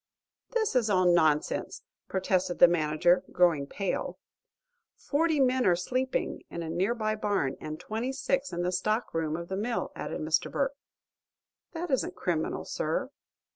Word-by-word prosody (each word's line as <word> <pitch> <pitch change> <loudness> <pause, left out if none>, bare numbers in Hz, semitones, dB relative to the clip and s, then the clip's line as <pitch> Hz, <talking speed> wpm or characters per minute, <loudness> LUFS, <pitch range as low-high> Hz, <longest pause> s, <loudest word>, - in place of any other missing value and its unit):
"This 440 - +1
is 235 -4 +3
all 185 -2 +3
nonsense!" 160 -4 +2 0.2
protested 185 -1 0
the 175 - +9
manager, 175 +2 +2
growing 165 -6 +3
pale. 195 +6 -3 0.8
"Forty 315 +1 +1
men 260 -1 +3
are 175 - +5
sleeping 255 +9 -2
in 170 - -5
a 160 - -4
near 190 +8 +1
by 215 -2 0
barn, 205 -11 0
and 155 +1 -6
twenty 225 +7 -3
six 275 +1 -1
in 175 0 -2
the 180 - 0
stock 215 +5 -1
room 160 -1 -1
of 170 0 -6
the 190 - -3
mill," 230 +4 -2
added - - -4
Mr. 155 +1 +1
Burke. 275 0 0 1.0
"That 335 -1 -4
isn't 265 - 0
criminal, 165 -3 -2
sir." - - -2
190 Hz, 155 wpm, -29 LUFS, 170-250 Hz, 1.0 s, the